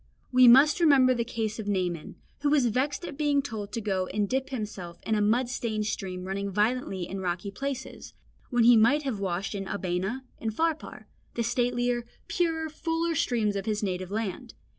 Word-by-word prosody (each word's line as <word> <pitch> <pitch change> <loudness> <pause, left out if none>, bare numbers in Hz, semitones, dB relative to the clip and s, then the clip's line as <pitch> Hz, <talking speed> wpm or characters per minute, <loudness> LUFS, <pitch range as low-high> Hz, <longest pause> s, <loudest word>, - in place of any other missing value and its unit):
We 255 -1 +7
must 275 +7 +7
remember 275 -6 +5
the 235 -1 0
case 225 -1 -3
of 210 - -5
Naaman, 180 -5 -2 0.2
who 290 - +1
was 285 -4 +4
vexed 260 +8 0
at 275 - -8
being 290 -2 +2
told 215 -6 -6
to 235 - -1
go 190 -3 -1
and 205 -1 -1
dip 265 +4 -1
himself 205 -9 -5
in 220 - -1
a 210 - +2
mud 235 +5 +2
stained 220 -4 -2
stream 185 -3 -4
running 195 +1 -3
violently 210 -2 0
in 195 - -5
rocky 180 +1 -3
places, 270 +4 -6 0.3
when 245 -2 +3
he 240 +1 +8
might 275 +7 +4
have 260 -7 -2
washed 190 +1 -2
in 195 -1 -4
Abana 195 +6 -2 0.2
and 225 - -2
Pharpar, 320 +1 -2 0.3
the 235 - 0
statelier, 245 0 0 0.2
purer, 325 -2 0
fuller 330 +2 -1
streams 225 -8 +1
of 195 +1 -3
his 210 -1 -1
native 185 -2 -2
land. 210 -2 -4
225 Hz, 185 wpm, -28 LUFS, 200-265 Hz, 0.3 s, he